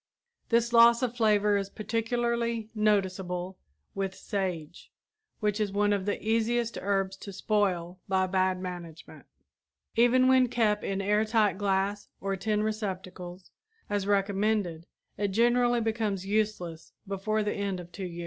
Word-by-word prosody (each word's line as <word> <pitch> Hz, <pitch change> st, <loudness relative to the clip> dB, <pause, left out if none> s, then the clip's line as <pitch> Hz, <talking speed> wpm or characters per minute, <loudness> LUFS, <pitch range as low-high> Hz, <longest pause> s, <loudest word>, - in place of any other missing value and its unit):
This 235 Hz, 0 st, +2 dB
loss 235 Hz, +1 st, +7 dB
of 245 Hz, -1 st, -1 dB
flavor 210 Hz, -3 st, +3 dB
is 195 Hz, -1 st, -3 dB
particularly 230 Hz, +1 st, -1 dB
noticeable 190 Hz, -4 st, 0 dB, 0.3 s
with 195 Hz, -1 st, -3 dB
sage, 180 Hz, -5 st, -4 dB, 0.5 s
which 210 Hz, 0 st, 0 dB
is 210 Hz, -2 st, 0 dB
one 205 Hz, +1 st, +2 dB
of 200 Hz, -1 st, -2 dB
the 205 Hz, -, -1 dB
easiest 230 Hz, +1 st, +1 dB
herbs 195 Hz, -1 st, 0 dB
to 200 Hz, -, -8 dB
spoil 185 Hz, -3 st, -1 dB
by 190 Hz, -1 st, +2 dB
bad 185 Hz, 0 st, +1 dB
management. 175 Hz, -3 st, -8 dB, 0.7 s
Even 245 Hz, +2 st, +5 dB
when 260 Hz, -1 st, +5 dB
kept 220 Hz, -3 st, +1 dB
in 195 Hz, 0 st, -2 dB
air 210 Hz, +2 st, +2 dB
tight 215 Hz, -3 st, +2 dB
glass 200 Hz, 0 st, 0 dB
or 195 Hz, 0 st, -2 dB
tin 210 Hz, +2 st, 0 dB
receptacles, 185 Hz, -4 st, -5 dB, 0.4 s
as 200 Hz, -1 st, -1 dB
recommended, 200 Hz, -4 st, 0 dB, 0.3 s
it 205 Hz, -, +1 dB
generally 240 Hz, +4 st, +3 dB
becomes 215 Hz, -4 st, -1 dB
useless 195 Hz, -6 st, -2 dB
before 210 Hz, +2 st, -1 dB
the 210 Hz, -, -1 dB
end 200 Hz, -2 st, -2 dB
of 175 Hz, 0 st, -10 dB
two 195 Hz, -, -7 dB
years. 175 Hz, -2 st, -6 dB
205 Hz, 140 wpm, -28 LUFS, 190-220 Hz, 0.7 s, loss